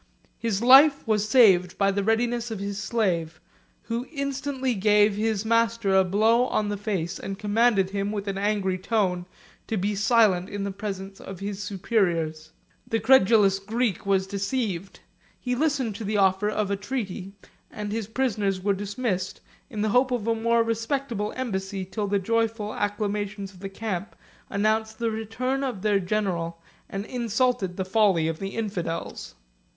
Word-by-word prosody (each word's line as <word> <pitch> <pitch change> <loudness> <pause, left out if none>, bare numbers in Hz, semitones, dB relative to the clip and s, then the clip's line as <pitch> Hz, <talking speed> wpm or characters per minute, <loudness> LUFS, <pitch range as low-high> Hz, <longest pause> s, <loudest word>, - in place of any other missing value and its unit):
His 225 -2 -1
life 275 +3 +7
was 215 -1 +1
saved 190 -8 +5
by 195 -1 +3
the 200 0 -1
readiness 235 +2 0
of 220 - -4
his 200 +1 -4
slave, 170 -8 -1 0.4
who 235 +2 -3
instantly 275 -2 -2
gave 210 0 +4
his 215 0 -1
master 230 -2 +2
a 190 0 +6
blow 220 +6 +3
on 210 -4 0
the 205 - -1
face, 190 -4 -3
and 195 0 -5
commanded 210 -2 +2
him, 200 0 -2
with 205 -1 -4
an 195 0 -2
angry 200 -2 0
tone, 185 -3 0 0.4
to 220 - -1
be 200 +3 0
silent 205 -3 +3
in 205 -1 -4
the 200 - -2
presence 195 -1 -6
of 190 -2 -8
his 200 0 -4
superiors. 175 -6 -1 0.4
The 225 - 0
credulous 210 -4 +5
Greek 220 +1 -1
was 195 -1 +1
deceived: 195 -1 -3 0.4
he 250 - -2
listened 270 -4 0
to 225 - -6
the 210 +1 -1
offer 190 +1 +3
of 210 -1 -1
a - - +2
treaty, 195 -3 -5 0.4
and 210 -1 -5
his 220 -1 -3
prisoners 210 -6 0
were 200 +2 +1
dismissed 200 -1 -3 0.3
in 215 -5 -3
the 215 - +1
hope 250 +4 +3
of 245 -4 -2
a 230 - +2
more 230 +1 +2
respectable 230 -1 -2
embassy, 195 -6 -3
till 205 +2 -3
the 200 0 +1
joyful 225 +1 -1
acclamations 205 -1 -3
of 180 - -16
the 195 +1 -6
camp 195 -1 -4 0.3
announced 220 +2 0
the 230 -1 -1
return 245 +5 -2
of 245 -8 -3
their 205 -2 +3
general, 180 -4 -2 0.3
and 195 +1 -4
insulted 235 -6 0
the 190 - -2
folly 190 -5 +3
of 160 -1 -3
the 195 0 -5
infidels. 195 -7 -4
210 Hz, 165 wpm, -25 LUFS, 195-230 Hz, 0.4 s, life